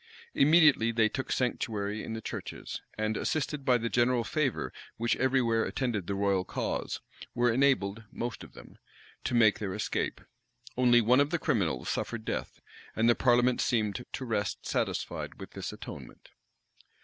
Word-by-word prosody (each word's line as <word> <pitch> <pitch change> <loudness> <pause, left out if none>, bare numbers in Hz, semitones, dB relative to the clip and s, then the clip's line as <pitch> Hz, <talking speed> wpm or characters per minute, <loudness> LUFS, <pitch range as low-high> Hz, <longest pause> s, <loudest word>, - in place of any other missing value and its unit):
Immediately 150 -6 +5
they 110 -1 +3
took 130 +2 -4
sanctuary 110 -4 -1
in 115 - -5
the 110 -1 -6
churches; - - -6 0.2
and, 110 0 0
assisted 150 0 -1
by 125 -2 +4
the 115 0 -2
general 120 0 +2
favor 140 +1 -1 0.2
which 115 +1 +1
every 130 0 +2
where 115 -1 +2
attended 115 -9 -2
the 100 - -1
royal 100 -2 +1
cause, - - -3 0.3
were 120 -1 +3
enabled, 115 -5 +2
most 120 -1 -4
of - - -13
them, - - -14 0.4
to - - -1
make 110 -3 +5
their 95 -3 -3
escape. 105 - -2 0.6
Only 120 -1 +5
one 125 +4 +4
of 145 +1 +3
the 170 - 0
criminals 100 - 0
suffered - - -3
death; - - -4 0.3
and 115 +1 +2
the 120 - +7
parliament 125 0 +3
seemed 110 -1 0
to 130 - -4
rest 105 -4 -2
satisfied - - -2
with - - -9
this - - -5
atonement. - - -10
120 Hz, 160 wpm, -30 LUFS, 110-130 Hz, 0.6 s, the